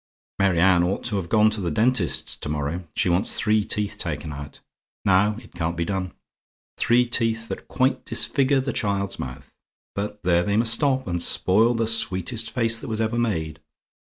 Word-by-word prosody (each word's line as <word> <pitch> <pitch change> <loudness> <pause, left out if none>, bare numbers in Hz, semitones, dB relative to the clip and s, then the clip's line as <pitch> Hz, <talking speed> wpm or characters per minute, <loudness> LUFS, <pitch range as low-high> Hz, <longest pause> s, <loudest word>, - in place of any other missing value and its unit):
"Mary 95 -4 +2
Anne 90 0 +5
ought 90 +3 -1
to 110 -4 -1
have 85 -3 -4
gone 110 +2 +4
to 105 -1 -3
the 90 - -1
dentist's 105 +1 0
to - - -7
morrow. 75 +4 -3
She - - +1
wants 90 +4 +1
three 105 -1 +3
teeth 105 0 -1
taken 75 -2 -4
out. 70 0 -9 0.5
Now, 100 +3 +3
it 115 -3 -14
can't 85 -1 -3
be 85 - -1
done. 95 -1 -3 0.6
Three 120 +1 +3
teeth 115 -1 0
that - - -6
quite 130 +1 0
disfigure 135 -1 +1
the 130 -1 -3
child's 100 -2 -1
mouth. 60 -1 -8 0.4
But 105 0 -5
there 85 -1 +3
they 100 +3 0
must 115 0 +2
stop, 130 +1 0
and 85 -1 -2
spoil 110 +8 +3
the 115 0 0
sweetest 110 0 +1
face 115 -2 +1
that - - -8
was 110 -2 -3
ever 115 +1 0
made. 80 -9 -2
105 Hz, 185 wpm, -23 LUFS, 90-115 Hz, 0.6 s, Anne